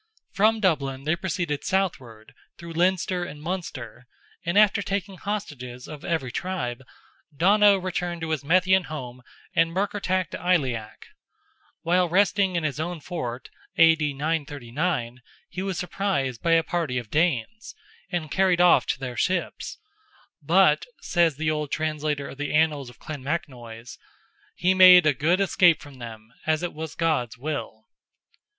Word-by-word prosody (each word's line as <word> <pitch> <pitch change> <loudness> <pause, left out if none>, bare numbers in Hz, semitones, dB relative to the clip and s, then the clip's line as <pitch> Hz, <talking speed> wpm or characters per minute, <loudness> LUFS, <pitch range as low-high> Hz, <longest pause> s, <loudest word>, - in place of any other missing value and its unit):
From 220 +2 +3
Dublin 140 -9 0
they 155 +3 +1
proceeded 170 -5 -3
southward, 130 - -2 0.2
through 170 -1 -9
Leinster 180 +1 +1
and 150 -4 -8
Munster, 140 - -6 0.4
and 170 +4 -1
after 210 -1 +5
taking 195 0 -3
hostages 135 - -5
of 150 -2 -9
every 160 -7 -2
tribe, 135 -7 -3 0.6
Donogh 200 +2 +5
returned 175 -2 -3
to 165 -1 -3
his 155 -2 -1
Methian 185 +4 +3
home 125 -5 -7 0.3
and 165 0 +2
Murkertach 185 -2 -1
to - - -5
Aileach. 135 -12 -1 0.8
While 175 +1 +2
resting 195 +1 +2
in 170 - 0
his 150 -1 -2
own 175 +1 -3
fort 130 -7 -6 0.3
(A.D. 160 -3 +4
939), 145 -3 -2 0.3
he 185 - -5
was 190 -1 -3
surprised 180 - -2
by 165 - +2
a 165 0 +4
party 160 -7 -2
of 120 -4 -5
Danes, 165 - -1 0.3
and 170 -5 -3
carried 185 -2 +2
off 175 0 +5
to - - -1
their 125 -2 -5
ships, 180 +8 -2 0.6
but, - - +3
says 170 -4 +2
the 155 +2 0
old 150 -1 -2
translator 150 -2 -2
of 135 - -11
the 145 +1 -2
Annals 150 -4 +1
of 125 - -16
Clonmacnoise, 130 -6 -6 0.6
"he 185 +1 +2
made 185 -2 +8
a 150 - +4
good 165 +8 +1
escape 180 -4 +4
from 140 -3 -13
them, 115 -1 -10
as 155 +1 +1
it 175 - -3
was 160 0 -7
God's 140 -8 0
will." 145 +4 -5
160 Hz, 145 wpm, -25 LUFS, 135-180 Hz, 0.8 s, made